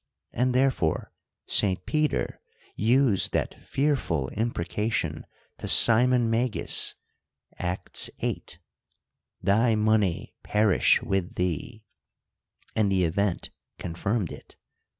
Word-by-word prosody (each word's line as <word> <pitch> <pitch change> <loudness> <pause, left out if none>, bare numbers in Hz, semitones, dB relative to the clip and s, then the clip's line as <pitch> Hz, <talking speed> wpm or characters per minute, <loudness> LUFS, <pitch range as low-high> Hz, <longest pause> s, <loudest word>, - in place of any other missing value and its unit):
And 125 +1 0
therefore 130 -12 0 0.3
St. 95 -3 +1
Peter 155 -1 -1 0.3
used 115 -2 +2
that - - -3
fearful 130 - -1
imprecation 105 -5 -3 0.3
to - - -6
Simon 120 +1 +7
Magus 115 0 +1 0.6
(Acts 90 0 -1
viii.), - - -3 0.6
— - - -57
Thy 110 +4 +2
money 105 -4 0
perish 105 -2 +2
with 95 -2 -2
thee: 90 - -4 0.9
and 105 -2 +1
the 95 -1 +2
event 90 +2 -1 0.3
confirmed 90 +3 -3
it. - - -12
105 Hz, 95 wpm, -26 LUFS, 90-120 Hz, 0.9 s, Simon